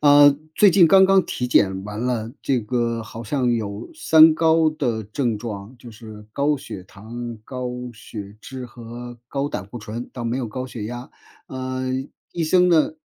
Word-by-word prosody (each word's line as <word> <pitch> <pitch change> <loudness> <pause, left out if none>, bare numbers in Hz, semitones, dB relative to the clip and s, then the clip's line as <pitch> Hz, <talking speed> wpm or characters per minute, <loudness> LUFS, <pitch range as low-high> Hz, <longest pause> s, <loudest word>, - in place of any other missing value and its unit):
呃， 145 -1 +7 0.2
最 205 - +6
近 180 -1 +6
刚 190 +3 +7
刚 190 -1 +5
体 125 - -3
检 95 -5 +3
完 105 +1 -6
了， 120 -2 -1
这 130 -3 +1
个 115 +1 -1
好 115 +1 -9
像 125 +1 +1
有 105 - -4
“三 160 - +7
高” 160 -1 +4
的 120 -8 -2
症 115 +2 -1
状。 105 +1 -7
就 120 -1 -11
是 110 -1 -11
高 145 +4 +1
血 130 -9 -8
糖、 115 +5 -8
高 125 0 -4 0.2
血 105 -2 -9
脂 130 +2 -7
和 120 0 -9
高 140 0 -2
胆 95 -8 -5
固 120 +4 -8
醇， 110 +3 -6
倒 125 - -6
没 115 +2 -1
有 125 - -2
高 130 +4 -4
血 115 -4 -6
压。 120 +3 -6 0.4
嗯， 130 +1 -3 0.2
医 170 -2 -1
生 180 +2 +4
呢 165 - +4
120 Hz, 195 characters per minute, -22 LUFS, 110-145 Hz, 0.4 s, 呃